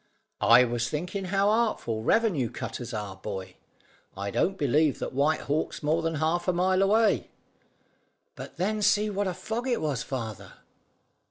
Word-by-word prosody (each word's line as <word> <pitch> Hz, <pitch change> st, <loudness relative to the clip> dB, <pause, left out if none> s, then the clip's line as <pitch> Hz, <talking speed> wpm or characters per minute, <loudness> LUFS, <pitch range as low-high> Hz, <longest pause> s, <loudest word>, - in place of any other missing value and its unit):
"I 120 Hz, +2 st, +7 dB
was 120 Hz, -1 st, -1 dB
thinking 180 Hz, -, -3 dB
how 195 Hz, +2 st, +2 dB
artful 215 Hz, -, 0 dB
revenue 170 Hz, -, +2 dB
cutters 120 Hz, -1 st, -6 dB
are, 105 Hz, -4 st, -5 dB
boy. 95 Hz, -1 st, -7 dB, 0.6 s
I 100 Hz, +1 st, -3 dB
don't 190 Hz, -, 0 dB
believe 150 Hz, 0 st, +2 dB
that -, -, -5 dB
White 145 Hz, +4 st, +1 dB
Hawk's 150 Hz, +1 st, -2 dB
more 155 Hz, +3 st, +1 dB
than 165 Hz, 0 st, -1 dB
half 160 Hz, +4 st, 0 dB
a 180 Hz, -, +3 dB
mile 185 Hz, +2 st, +2 dB
away." 215 Hz, +3 st, +3 dB, 1.0 s
"But -, -, -10 dB
then 210 Hz, +4 st, -1 dB
see 210 Hz, +1 st, +3 dB
what 200 Hz, 0 st, -1 dB
a 185 Hz, -, -1 dB
fog 235 Hz, +3 st, -4 dB
it 245 Hz, -2 st, +1 dB
was, 145 Hz, -6 st, -1 dB
father?" 115 Hz, -6 st, -6 dB
160 Hz, 160 wpm, -27 LUFS, 120-195 Hz, 1.0 s, I